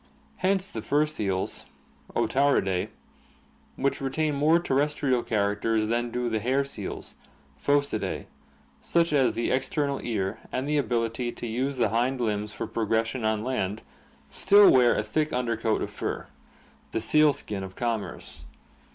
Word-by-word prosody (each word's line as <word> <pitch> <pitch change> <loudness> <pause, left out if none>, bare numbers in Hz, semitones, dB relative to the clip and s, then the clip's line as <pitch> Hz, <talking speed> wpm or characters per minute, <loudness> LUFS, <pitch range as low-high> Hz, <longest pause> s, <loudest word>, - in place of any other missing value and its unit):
Hence 190 +1 +1
the - - -5
fur 150 +2 +2
seals 100 -11 -2 0.5
(Otariidae) 130 -10 +2 0.9
which 140 +1 -1
retain 150 +3 0
more 150 +4 +4
terrestrial 145 -5 +1
characters 110 +1 0
than 120 +1 0
do 125 +1 -2
the 110 -2 0
hair 130 +5 +1
seals 140 - -7 0.5
(Phocidae), 145 0 0 0.6
such 170 -2 +1
as 135 -3 +3
the 115 - -1
external 140 +2 0
ear 100 -5 -2
and 130 +2 -2
the 150 0 +2
ability 120 -1 -1
to - - -7
use 130 +4 -2
the 115 -4 +2
hind 125 +4 0
limbs 105 -3 -1
for - - -4
progression 115 +2 -1
on 110 -1 0
land, 110 -5 -2 0.4
still 205 0 +6
wear 125 -2 +5
a - - 0
thick 150 +8 -1
under 120 -2 0
coat 110 0 0
of - - -5
fur - - -4 0.3
— - - -31
the - - +1
sealskin 115 -4 +2
of 95 0 -8
commerce. 110 -11 -4
120 Hz, 145 wpm, -27 LUFS, 110-140 Hz, 0.9 s, still